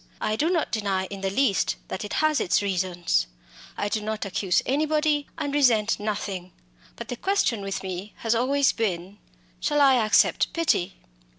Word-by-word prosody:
I 215 Hz, -, -1 dB
do 305 Hz, +9 st, +1 dB
not 345 Hz, -3 st, 0 dB
deny 200 Hz, -4 st, -1 dB
in 195 Hz, -1 st, -6 dB
the 195 Hz, -, 0 dB
least 200 Hz, 0 st, +1 dB
that 190 Hz, -, -4 dB
it 210 Hz, -, -6 dB
has 310 Hz, -1 st, +2 dB
its 185 Hz, -, +1 dB
reasons. 175 Hz, -, 0 dB, 0.5 s
I 205 Hz, -, -1 dB
do 215 Hz, +1 st, -1 dB
not 215 Hz, -1 st, -3 dB
accuse 190 Hz, -1 st, 0 dB
anybody, 300 Hz, +1 st, +1 dB
and 285 Hz, -, -3 dB
resent 230 Hz, -7 st, +3 dB
nothing. 200 Hz, -4 st, -4 dB, 0.4 s
But 235 Hz, -, -8 dB
the 245 Hz, -, -3 dB
question 315 Hz, -, 0 dB
with 195 Hz, 0 st, -4 dB
me 190 Hz, +2 st, -6 dB
has 225 Hz, 0 st, 0 dB
always 265 Hz, +4 st, +2 dB
been, 190 Hz, -3 st, -3 dB, 0.4 s
Shall 295 Hz, -, 0 dB
I 265 Hz, -4 st, +5 dB
accept 215 Hz, -, +3 dB
pity? 200 Hz, -, 0 dB
215 Hz, 170 wpm, -25 LUFS, 195-275 Hz, 0.5 s, I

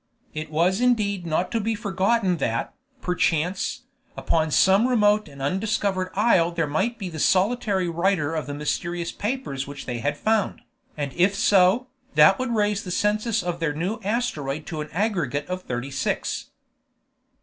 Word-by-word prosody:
It 155 Hz, 0 st, -5 dB
was 175 Hz, +7 st, +1 dB
indeed 205 Hz, -7 st, +1 dB
not 165 Hz, +3 st, 0 dB
to 230 Hz, -, 0 dB
be 225 Hz, +1 st, -1 dB
forgotten 200 Hz, -2 st, +1 dB
that, 115 Hz, -6 st, -2 dB, 0.3 s
perchance, 180 Hz, +6 st, 0 dB, 0.3 s
upon 160 Hz, -1 st, +1 dB
some 190 Hz, -, +4 dB
remote 210 Hz, -4 st, +3 dB
and 140 Hz, -1 st, -9 dB
undiscovered 190 Hz, +2 st, 0 dB
isle 195 Hz, -5 st, +4 dB
there 170 Hz, -2 st, -1 dB
might 190 Hz, +11 st, -1 dB
be 195 Hz, -, -5 dB
the 160 Hz, -3 st, -7 dB
solitary 195 Hz, +1 st, +2 dB
writer 170 Hz, -2 st, 0 dB
of 155 Hz, -2 st, -3 dB
the 145 Hz, -, -4 dB
mysterious 170 Hz, +3 st, -2 dB
papers 205 Hz, -, -3 dB
which 140 Hz, 0 st, -8 dB
they 120 Hz, -2 st, -3 dB
had 145 Hz, +4 st, -1 dB
found, 220 Hz, +2 st, 0 dB, 0.4 s
and 145 Hz, -2 st, -3 dB
if 185 Hz, +3 st, +2 dB
so, 200 Hz, +3 st, +4 dB, 0.3 s
that -, -, +6 dB
would 255 Hz, -1 st, -1 dB
raise 210 Hz, -1 st, +1 dB
the 185 Hz, -, -7 dB
census 215 Hz, +4 st, 0 dB
of 175 Hz, -1 st, -3 dB
their 165 Hz, -3 st, 0 dB
new 185 Hz, +9 st, -2 dB
asteroid 160 Hz, -, -2 dB
to 160 Hz, -5 st, -4 dB
an 150 Hz, -, -6 dB
aggregate 175 Hz, -6 st, -1 dB
of 185 Hz, 0 st, -4 dB
thirty 125 Hz, -2 st, -4 dB
six. -, -, -2 dB
185 Hz, 160 wpm, -24 LUFS, 155-210 Hz, 0.4 s, that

